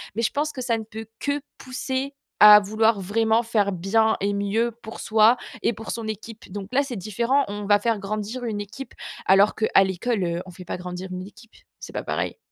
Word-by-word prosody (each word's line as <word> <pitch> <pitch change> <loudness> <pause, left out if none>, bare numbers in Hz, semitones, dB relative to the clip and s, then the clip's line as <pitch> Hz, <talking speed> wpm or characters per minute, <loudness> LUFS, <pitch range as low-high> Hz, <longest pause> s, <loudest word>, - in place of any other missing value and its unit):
Mais, 230 - -1
je 230 - +1
pense 300 +2 -1
que 260 - -7
ça 240 -2 0
ne 220 - -5
peut 220 +1 -8
que 285 0 -1 0.2
pousser 260 +2 -3 0.3
à 210 0 +11
vouloir 215 +1 +2
vraiment 220 +4 +2
faire 220 -4 +1
bien 210 +5 +2
et 200 +1 +1
mieux 205 +4 0
pour 220 0 -8
soi 220 +2 +4 0.3
et - - +2
pour 225 0 -9
son 230 -2 -4
équipe, 220 -1 -8
donc 200 0 -6
là 275 +2 +3
c'est 270 -3 -6
différent. 235 +7 +1
On 205 0 -5
va 205 0 +4
faire 230 0 +1
grandir 215 +5 -4
une 210 -3 -2
équipe, 220 +7 -9 0.3
alors 195 +2 +5
qu'à 215 -3 +4
l'école, 195 +3 -1
heu, 170 0 -1
on 185 - -10
fait 180 +1 -11
pas - - -4
grandir 180 +1 -6
une 185 0 -5
équipe, 215 +3 -16 0.2
c'est - - -10
pas - - -3
pareil. - - -2
220 Hz, 215 wpm, -24 LUFS, 200-235 Hz, 0.3 s, à